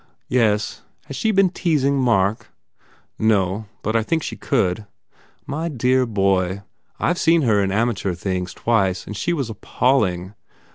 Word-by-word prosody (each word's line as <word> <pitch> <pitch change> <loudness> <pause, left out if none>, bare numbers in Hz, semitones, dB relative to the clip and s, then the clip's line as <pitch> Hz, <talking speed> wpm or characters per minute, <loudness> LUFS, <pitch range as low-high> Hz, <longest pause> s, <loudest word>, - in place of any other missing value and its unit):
"Yes. 110 -4 +1 0.2
Has 140 - -8
she 220 - 0
been 195 -3 +3
teasing 140 -7 +1
Mark 110 -4 +1 0.4
" - - -34
"No. 100 +2 -1 0.2
But 110 - -1
I 115 - +4
think 160 +8 -1
she - - -4
could." 105 -5 -1 0.6
"My 160 +4 -3
dear 130 -2 +1
boy, 95 -2 0 0.4
I 175 - +2
ve 175 - -6
seen 165 -1 +3
her 105 -5 +3
in 95 -1 0
amateur 100 -4 0
things 90 0 -3
twice 95 -6 0
and 105 - -7
she 175 - -1
was 135 -9 -2
appalling! 105 -5 0
110 Hz, 155 wpm, -21 LUFS, 95-135 Hz, 0.6 s, I